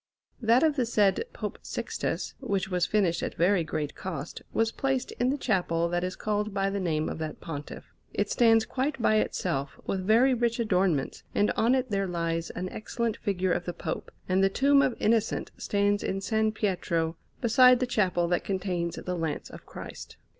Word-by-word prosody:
That 235 +4 +4
of 305 -2 +3
the 250 - +2
said 210 - +3
Pope - - -5
Sixtus, - - -3
which 200 -7 -1
was 180 -2 +1
finished 185 -5 +1
at - - -3
very 180 +1 +3
great 150 -2 -3
cost, 170 -7 -6
was 225 0 +1
placed 270 0 -1
in 245 +1 +2
the 280 - 0
chapel 175 -9 +1
that 175 +1 -1
is 185 0 -2
called 210 -1 -2
by 195 0 +1
the 200 - -2
name 160 -4 0
of - - -4
that 155 -1 -5
Pontiff. 145 -3 -7 0.3
It - - 0
stands 225 -2 +4
quite 270 +2 -2
by 215 -1 +3
itself, 140 -10 -1
with 190 -1 -2
very 235 +7 +5
rich 235 -1 0
adornments, 185 - +1
and 205 - +3
on 235 +4 +3
it 255 -3 -1
there 195 -1 0
lies 165 -1 -2
an 180 +1 -4
excellent 230 +2 -3
figure 185 -2 -1
of 175 0 0
the 175 - -3
Pope; - - -5 0.2
and 185 +1 +2
the 195 - +5
tomb 275 +6 +4
of 255 - +1
Innocent 220 0 +1
stands 205 0 +1
in 190 - -2
S. 195 +3 -6 0.2
Pietro, 170 -5 0 0.2
beside 250 +1 +6
the 255 - +1
chapel 185 -8 +1
that 175 - +1
contains 180 -3 -2
the 180 - -4
Lance 160 -3 -3
of - - -12
Christ. - - -9
195 Hz, 190 wpm, -28 LUFS, 175-230 Hz, 0.3 s, beside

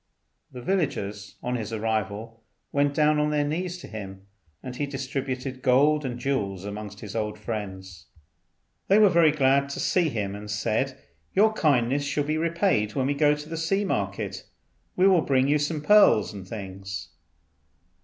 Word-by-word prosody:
The 125 -1 -9
villagers 105 - -2
on 125 0 -1
his 110 -1 -5
arrival 110 0 -3 0.3
went 145 0 +1
down 150 0 +3
on 150 0 +2
their 150 -1 +1
knees 175 +4 -2
to - - -9
him, 95 -3 -8 0.4
and 125 -1 -6
he 145 +2 -2
distributed 130 -1 -4
gold 145 +4 +4
and 125 -3 -4
jewels 100 -8 -2
amongst 105 0 -7
his 105 -1 -8
old 105 -1 -2
friends. 95 -4 -6 0.8
They 195 - +5
were 215 -2 +7
very 170 -3 +5
glad 140 -1 +2
to 140 - -5
see 175 -3 +2
him, 105 -6 -3
and 105 +1 -8
said, 115 +6 -1 0.4
"Your 215 +3 +5
kindness 140 - +2
shall 145 +1 -1
be 155 +2 -1
repaid 165 - +1
when 135 -2 +1
we 140 - +1
go 145 +1 +3
to 150 0 -9
the 165 - -5
sea 195 +5 0
market; - - -3 0.5
we 185 +1 +4
will 185 -4 +5
bring 135 -2 +2
you 150 +1 +3
some 150 +1 -2
pearls 205 - +5
and 95 -2 -9
things." 95 -2 -7
130 Hz, 170 wpm, -26 LUFS, 105-150 Hz, 0.8 s, were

